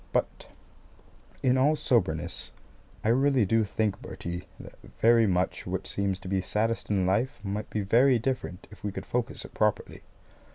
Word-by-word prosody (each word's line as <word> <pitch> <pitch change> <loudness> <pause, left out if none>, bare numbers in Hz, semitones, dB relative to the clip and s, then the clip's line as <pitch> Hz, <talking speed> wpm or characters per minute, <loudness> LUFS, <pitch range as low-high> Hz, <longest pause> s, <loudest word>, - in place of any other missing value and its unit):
But - - -1 1.0
in 130 0 +3
all 145 +4 +4
soberness, 85 - 0 0.5
I 110 - +1
really 135 -1 +3
do 115 +3 +3
think, 105 0 -1
Bertie, 85 +1 -6
that - - -12 0.2
very 115 -1 +5
much 90 -1 0
which - - -3
seems 100 -1 -1
to - - -9
be 95 0 0
saddest 110 +5 -1
in 95 -3 +2
life 105 +8 0
might 105 +1 -3
be 105 - -2
very 120 +6 +4
different 115 -6 -3
if 105 - -15
we 105 - -2
could - - -6
focus 125 0 -2
it - - -12
properly. 105 -1 0
105 Hz, 165 wpm, -28 LUFS, 95-120 Hz, 1.0 s, very